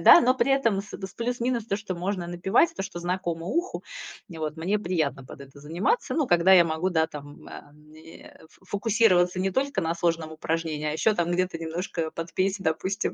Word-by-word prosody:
да, - - +9
но 255 -3 +3
при 260 0 +1
этом 230 -8 +2
с 190 -2 -8
плюс-минус 240 -1 -1
то, 200 - 0
что 205 -3 -5
можно 180 0 -3
напевать, 190 - +2
то, - - -2
что 190 -2 -6
знакомо 175 -1 -3
уху. 345 - -2 0.4
Вот, 160 -3 -5
мне 185 +6 0
приятно 155 -8 -1
под 130 - -12
это 140 +1 -15
заниматься, 170 - -1
ну, 305 -4 +1
когда 175 -2 +5
я 180 -2 +8
могу, 165 +3 -1
да 160 -2 +2
там, 145 -2 -11
а, 145 - -11
мне, 155 +2 -15
ф 160 - -20
фокусироваться 200 -3 +2
не 190 +1 0
только 270 -3 0
на 165 0 -1
сложном 165 -2 -1
упражнении, 160 -1 -2
а - - -1
еще 210 +8 +2
там 175 -2 0
где-то 180 -1 0
немножко 165 0 -3
под 165 +1 -7
песни, 190 +1 0
допустим, 185 +5 -1
175 Hz, 195 wpm, -26 LUFS, 160-200 Hz, 0.4 s, да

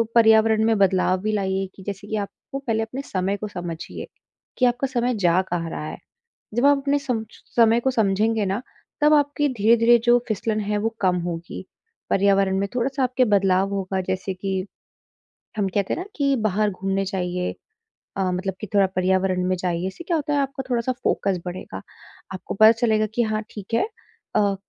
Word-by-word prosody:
पर्यावरण 220 -1 +5
में 225 -1 +3
बदलाव 190 -1 +3
भी 215 +2 -1
लाइए 195 -1 0
कि 190 - -12
जैसे 200 +1 -6
कि 220 - -2
आप - - -21 0.2
को 275 - -3
पहले 225 -5 -1
अपने 250 +5 -5
समय 195 -4 -2
को 210 - -5
समझिए, 175 -4 -6 0.5
कि 255 - +3
आपका 245 +2 +1
समय 250 -1 0
जा 175 +2 +4
कहाँ 170 -2 -1
रहा 150 - -5
है? - - -6 0.6
जब 240 +4 +3
आप 285 0 +5
अपने 280 +1 +1
समश 225 -6 -4
समय 230 0 +5
को 265 - +1
समझेंगे 215 0 +1
ना, 195 +6 -2 0.4
तब 300 +1 +6
आपकी 290 0 +2
धीरे-धीरे 230 +2 +5
जो 240 0 +5
फिसलन 215 0 -1
है, 210 0 -1
वो 215 +2 0
कम 185 -2 +2
होगी। 170 0 -6 0.4
पर्यावरण 195 -1 +3
में 200 +1 -1
थोड़ा-सा 265 +3 -1
आपके 255 0 +2
बदलाव 195 -3 +2
होगा 190 -1 -2
जैसे 190 +1 -2
कि 190 0 -3 0.9
हम 200 -2 +1
कहते 200 -2 0
हैं - - -5
ना 365 - -6
कि 280 -2 +2
बाहर 210 +1 +1
घूमने 195 +1 -2
जाइए 180 -2 -2 0.6
अ, 190 -2 0
मतलब 185 +2 -2
कि 215 - -5
थोड़ा 200 -1 +6
पर्यावरण 185 0 +1
में 185 - +1
जाइए। 180 0 -2
इससे 190 - -8
क्या 335 -1 +1
होता 295 -1 -2
है 290 - +2
आपका 270 -1 -3
थोड़ा-सा 240 0 0
फोकस 195 -3 0
बढ़ेगा। 180 +1 -6 0.5
आपको 185 - -6
पता 220 +2 +8
चलेगा 225 -2 +1
कि 240 - +2
हाँ, 215 -1 -1
ठीक 205 0 -10
है 395 - +2 0.5
अ, 200 -1 +3
210 Hz, 190 wpm, -23 LUFS, 190-240 Hz, 0.9 s, पता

